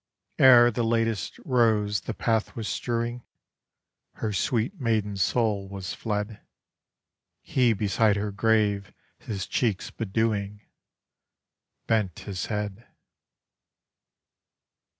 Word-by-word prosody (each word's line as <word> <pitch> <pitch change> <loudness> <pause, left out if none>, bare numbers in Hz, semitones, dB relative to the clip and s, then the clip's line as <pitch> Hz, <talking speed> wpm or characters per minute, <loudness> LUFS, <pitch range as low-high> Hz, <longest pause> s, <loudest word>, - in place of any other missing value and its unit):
Ere 120 -2 +8
the 120 - -2
latest 115 -2 0
rose 110 -6 +2
the 115 - -5
path 110 -2 0
was 110 -3 -4
strewing, 120 +4 -2 0.9
Her 110 -2 -3
sweet 120 - -1
maiden 110 -4 0
soul 100 0 0
was 95 -2 -5
fled; 105 0 -3 1.0
He 125 -3 +2
beside 105 +1 +2
her 105 0 -2
grave 105 -1 +1 0.3
his 100 -5 -5
cheeks 110 -6 -1
bedewing, 105 -1 -2 1.2
Bent 105 -6 0
his 95 -3 -5
head. 105 +1 -4
110 Hz, 95 wpm, -26 LUFS, 100-115 Hz, 1.2 s, Ere